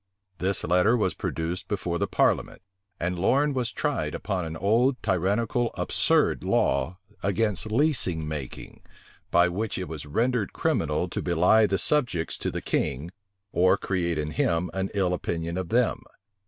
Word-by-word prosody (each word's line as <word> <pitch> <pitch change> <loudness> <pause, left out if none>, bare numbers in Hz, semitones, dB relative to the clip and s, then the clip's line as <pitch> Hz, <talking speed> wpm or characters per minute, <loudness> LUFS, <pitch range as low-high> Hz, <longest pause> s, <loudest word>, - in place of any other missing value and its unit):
This 95 +2 -1
letter 90 +8 +3
was 95 -6 +1
produced 80 +3 -3
before 90 -4 -2
the - - 0
parliament; - - 0 0.4
and 85 +1 -2
Lorne 140 +10 +2
was 125 -3 -1
tried - - -2
upon 95 -4 -2
an 80 0 -5
old, 115 - +3
tyrannical, 105 +6 +1
absurd - - +1
law 90 +3 +1 0.2
against 100 0 0
leasing 110 - +2
making; 75 -4 -7 0.5
by 85 +1 +4
which 100 +5 -2
it 90 -1 -4
was 75 -2 -7
rendered 115 - 0
criminal - - 0
to - - -3
belie 105 +6 +4
the 95 - 0
subjects 120 - 0
to - - -2
the - - -5
king, 70 +6 -1 0.4
or 95 +2 +4
create 85 -4 -1
in 75 0 -2
him 85 +3 0
an 95 0 -2
ill 95 -3 +1
opinion 85 -1 -3
of 95 -2 -3
them. 120 +1 +2
95 Hz, 155 wpm, -26 LUFS, 85-110 Hz, 0.5 s, by